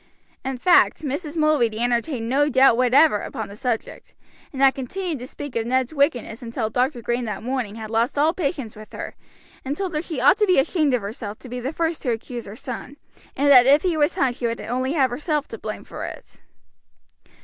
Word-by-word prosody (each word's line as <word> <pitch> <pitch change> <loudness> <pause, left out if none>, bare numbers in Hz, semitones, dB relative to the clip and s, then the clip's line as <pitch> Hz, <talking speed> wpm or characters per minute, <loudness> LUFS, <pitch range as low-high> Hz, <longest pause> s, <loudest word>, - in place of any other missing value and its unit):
In 265 -1 -3
fact 350 +3 +4
Mrs. 295 +3 -3
Mulready 295 -8 +2
entertained 240 0 0
no 285 +4 +2
doubt 260 -3 +5
whatever 255 0 +4
upon 220 -2 -6
the 200 - -10
subject, 240 -1 -4 0.4
and 270 - -8
had 270 -1 +6
continued 320 +4 -4
to 250 - -7
speak 290 0 -8
of 230 0 -1
Ned's 260 +2 0
wickedness 280 -6 0
until 230 -2 -3
Dr. 250 +1 0
Green 240 0 -1
that 215 -1 -5
morning 245 -4 -3
had 220 -1 -7
lost 230 +5 0
all 310 +3 +3
patience 280 -10 -3
with 215 0 -13
her, - - -6 0.5
and 275 +3 -3
told 380 -3 -3
her 305 - 0
she 320 -5 -5
ought 370 - +5
to 420 - +3
be 365 - +4
ashamed 285 0 +2
of 235 - -3
herself 210 0 -6
to 255 - -12
be 250 +1 -5
the 255 +3 -3
first 325 0 -2
to 260 - -2
accuse 235 0 -4
her 200 - -8
son, 250 +4 -7 0.4
and 285 +1 +3
that 250 -2 +8
if 285 +6 +5
he 360 -3 +1
was 295 -1 +2
hung 260 -3 +1
she 240 0 -2
would 230 0 -3
only 255 +4 -2
have 265 -6 +2
herself 295 +3 -1
to - - -7
blame - - -6
for - - -8
it. - - -9
260 Hz, 215 wpm, -23 LUFS, 235-295 Hz, 0.5 s, that